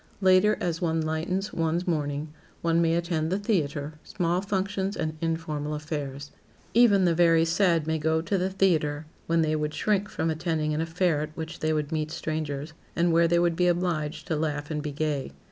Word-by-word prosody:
Later, 190 +2 +4
as 170 -2 -2
one 165 -2 +1
lightens 160 +5 -2
one's 165 +2 0
mourning, 150 -2 -1 0.3
one 165 0 +3
may 165 0 +2
attend 170 -2 -1
the 190 - +2
theater, 155 -7 -1
small 175 0 -1
functions 195 0 -2
and 155 0 -2
informal 155 -2 -2
affairs. 145 -2 -5 0.4
Even 210 -5 +5
the 170 - +3
very 165 -1 +4
sad 165 -2 +2
may 160 0 0
go 160 +1 +1
to 165 +5 -1
the 185 0 +1
theater 160 -6 +1 0.2
when 165 0 +3
they 155 0 +1
would 150 0 -2
shrink 205 -1 +1
from 160 -5 -1
attending 160 -1 -1
an 155 - 0
affair 165 -1 +1
at 155 0 -6
which 160 0 -6
they 155 - 0
would 150 -1 -1
meet 155 -1 -1
strangers 155 -2 -4 0.2
and 170 0 +2
where 170 0 +5
they 170 +1 +3
would 170 -1 +2
be 180 +1 +2
obliged 170 -4 -1
to 165 - -1
laugh 150 -1 -2
and 150 -1 -2
be 150 -1 -4
gay. 145 - -2
160 Hz, 195 wpm, -27 LUFS, 155-175 Hz, 0.4 s, Even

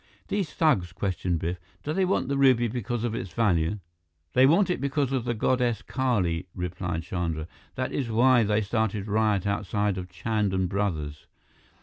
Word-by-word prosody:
"These 195 -7 -1
thugs," 100 - +2
questioned 90 -2 -1
Biff, 85 +2 -3 0.2
"do 150 - -2
they 190 +2 +2
want 185 - 0
the 140 - 0
ruby 130 -3 +4
because 120 0 -3
of 120 -2 -1
its 95 -6 -5
value?" 90 -4 +2 0.6
"They 130 +1 +6
want 180 +5 +4
it 175 - -2
because 140 -1 0
of 130 -3 -1
the 120 -1 -1
goddess 120 0 +1
Kali," 100 -11 0
replied 90 -2 -3
Chandra. 85 -3 -3 0.3
"That 130 0 -2
is 130 -4 -2
why 120 +2 +5
they 105 0 +2
started 110 -1 -1
riot 105 -2 +1
outside 100 -1 0
of 90 0 -7
Chand 100 +2 -1
and 95 -1 +1
Brothers. 80 -7 -3
105 Hz, 170 wpm, -27 LUFS, 90-125 Hz, 0.6 s, They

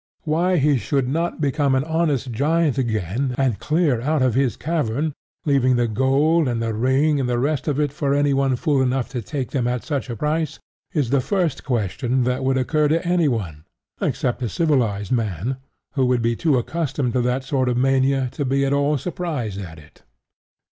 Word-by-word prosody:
Why 175 +4 +1
he 145 -1 +3
should 135 +1 0
not 165 +6 -1
become 140 -2 +1
an 130 - +1
honest 155 -5 0
giant 150 +3 +1
again 115 +2 -1
and 130 -6 +1
clear 150 -6 +1
out 150 +1 +1
of 130 -3 +2
his 130 -1 +1
cavern, 150 -2 -1 0.3
leaving 135 -3 +3
the 120 -1 +2
gold 135 +7 +2
and 120 -2 -1
the 115 -1 -1
ring 135 +6 +2
and 130 -2 -1
the 120 - +1
rest 140 +2 -1
of 145 -1 0
it 145 -2 0
for 140 -2 0
anyone 140 -2 +2
fool 140 +2 +1
enough 130 -1 0
to 125 -3 -4
take 135 +3 -4
them 125 -4 0
at 125 -1 -2
such 140 -4 -3
a 120 - -3
price, 155 +4 -1 0.3
is 145 -10 -1
the 140 -1 +3
first 170 +1 -1
question 125 +1 0
that 125 +2 -1
would 130 0 +1
occur 150 +4 +1
to 165 +4 0
anyone 115 - 0 0.4
except 125 - -1
a 120 - -1
civilized 120 - 0
man, 115 +1 -1 0.4
who 130 -3 +2
would 125 -2 +1
be 115 0 +1
too 150 +1 +2
accustomed 135 -1 -2
to 125 - +2
that 125 +2 0
sort 130 -1 0
of 120 - 0
mania 135 +1 +2
to 145 - -3
be 140 +1 +1
at 135 - +1
all 145 +1 +2
surprised 145 - -4
at 85 -4 -9
it. 80 -1 -17
135 Hz, 195 wpm, -22 LUFS, 125-150 Hz, 0.4 s, he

